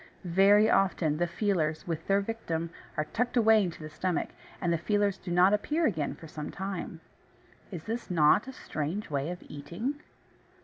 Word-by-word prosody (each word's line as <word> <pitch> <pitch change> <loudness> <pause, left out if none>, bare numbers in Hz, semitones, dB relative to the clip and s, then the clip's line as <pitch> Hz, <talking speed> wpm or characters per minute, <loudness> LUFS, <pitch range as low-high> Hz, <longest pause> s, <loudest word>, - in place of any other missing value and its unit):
Very 195 +4 +5
often 175 -7 +2
the 175 +1 +1
feelers, 170 -4 0
with 165 -1 -4
their 195 0 +3
victim, 170 -7 -3 0.3
are 155 - +1
tucked 245 +2 0
away 220 -2 +6
into 170 -4 -5
the 155 - -6
stomach, 185 +1 -1 0.3
and 170 -1 +1
the 165 - 0
feelers 205 +2 +1
do 185 - -8
not 180 +3 +5
appear 300 +10 +1
again 160 - 0
for 165 - -11
some 150 -1 -6
time. 195 0 -5 0.7
Is 170 -5 -8 0.2
not 160 +2 +4
this 265 0 -9
a - - -12
strange 155 +5 -3
way 140 +2 -1
of 180 0 -6
eating! 175 - -5
180 Hz, 175 wpm, -29 LUFS, 160-205 Hz, 0.7 s, away